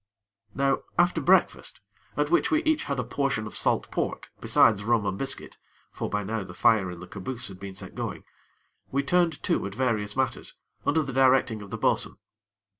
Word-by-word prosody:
Now 135 0 +2 0.2
after 175 +1 +3
breakfast, - - +2 0.4
at - - 0
which 350 - +3
we 315 - +3
had 315 0 -2
each 315 0 +1
a 135 -3 -1
portion 135 -2 -1
of 105 - -7
salt - - +1
pork, - - -3
besides 105 -3 +4
rum 115 -1 +2
and 95 - -1
biscuit 135 +6 -3 0.3
(for - - -4
by 105 0 -1
now 110 +1 -3
the 90 -2 -11
fire 105 -5 +3
in 90 -1 -8
the 90 - -8
caboose 110 +4 -5
had 95 -1 -11
been 100 -1 -8
set - - -7
going), - - -5 0.7
we 140 +1 +1
turned 170 -2 +1
to - - +1
at 100 - -8
various 110 -5 0
matters, 130 -1 -2 0.3
under 155 +2 +3
the 135 -2 -5
directing 130 -4 +3
of 100 - -10
the - - -4
bo'sun. - - +1
120 Hz, 190 wpm, -27 LUFS, 100-140 Hz, 0.7 s, besides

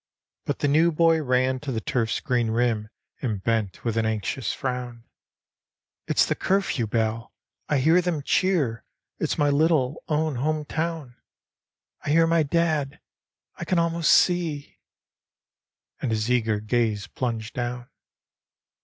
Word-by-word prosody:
But - - -2
the - - 0
new 160 +4 +4
boy 165 0 +3
ran 130 -1 +1
to 145 -1 -5
the 115 - -1
turf's 110 -1 -1
green 125 -5 0
rim 115 -2 0 0.3
and 105 -6 -3
bent 110 -4 -1
with 115 -1 -1
an 110 - +1
anxious 110 +2 -2
frown, 125 -2 -4 0.4
— - - -69
" - - -62
It's - - +3
the - - 0
curfew 190 - 0
bell! 110 +1 -1 0.4
I 150 - +2
hear 160 +7 +4
them 170 -5 -2
cheer! 145 -11 +1 0.4
It's - - -1
my 145 -1 +3
little 150 -2 +2
own 155 -3 0
home 155 +3 -1
town! 160 -5 -4 0.9
I - - -4
hear 165 +2 +5
my 165 0 +3
dad! 155 -2 0 0.6
I 175 - -5
can 180 +1 0
almost 170 -1 +2
see 170 -5 +2 0.6
" - - -43
and 130 - -1
his 110 +1 -1
eager 115 -4 +1
gaze 110 -2 0
plunged 115 0 -4
down. 120 0 -4
130 Hz, 150 wpm, -25 LUFS, 115-160 Hz, 0.9 s, hear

